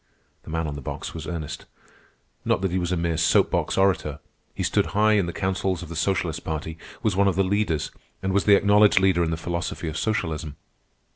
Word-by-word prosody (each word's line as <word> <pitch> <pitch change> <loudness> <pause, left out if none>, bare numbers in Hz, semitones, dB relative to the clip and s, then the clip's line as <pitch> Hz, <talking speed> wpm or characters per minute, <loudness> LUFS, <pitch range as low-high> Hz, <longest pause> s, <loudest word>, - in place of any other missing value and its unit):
The - - -13
man 80 +1 -1
on 75 - -3
the 70 - -7
box - - -6
was 80 -2 -7
Ernest. 80 -4 -5 0.8
Not - - +1
that 95 -2 0
he 95 - 0
was 90 0 -2
a 90 - +1
mere 85 -1 -1
soap 80 - +3
box - - 0
orator. 85 -6 +2 0.4
He - - -2
stood - - +1
high 110 +1 +5
in 100 -4 +2
the - - -2
councils 95 -1 -1
of 80 - -10
the 85 - -6
socialist 85 0 -1
party, 80 +1 -4 0.2
was 110 -4 +1
one 100 +1 +3
of 95 - +1
the 95 - +3
leaders, 95 -5 0 0.3
and 95 0 0
was 100 - +2
the 105 - +7
acknowledged 100 0 +5
leader 95 -2 +3
in 80 - 0
the 80 - -2
philosophy 85 0 -4
of 80 +1 -4
socialism. 80 -8 -2
85 Hz, 220 wpm, -24 LUFS, 80-95 Hz, 0.8 s, the